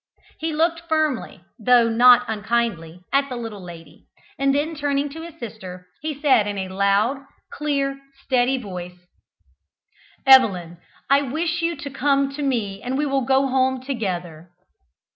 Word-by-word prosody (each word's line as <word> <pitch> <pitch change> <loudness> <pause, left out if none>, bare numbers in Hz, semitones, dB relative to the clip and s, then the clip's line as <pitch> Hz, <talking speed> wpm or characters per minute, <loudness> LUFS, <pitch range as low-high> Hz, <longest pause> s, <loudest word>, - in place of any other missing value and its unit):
He 320 0 -2
looked 330 +2 0
firmly 310 - -1 0.2
though 240 +1 +4
not 245 +2 +6
unkindly 210 -6 -2
at 275 0 +2
the 250 - -5
little 225 -4 -6
lady, 165 -3 -13 0.3
and 275 0 +2
then, 300 +3 -1
turning 285 -1 -1
to 320 +3 -9
his 335 -1 -11
sister, 190 -6 -8 0.2
he 305 -2 -4
said 265 -8 +3
in 205 -1 -3
a 190 -1 -4
loud, 200 +7 +1 0.3
clear, 275 -2 -2 0.2
steady 260 0 +1
voice, 180 -6 -7 1.3
"Evelyn, 185 -11 +5 0.3
I 280 +1 +4
wish 320 +5 -2
you 335 0 0
to 280 -1 -8
come 275 +1 +1
to 285 +2 -6
me 220 -8 -2
and 255 +2 -3
we 295 - 0
will 275 -1 0
go 270 +2 +3
home 260 0 +1
together." 180 - -5
255 Hz, 150 wpm, -22 LUFS, 205-280 Hz, 1.3 s, not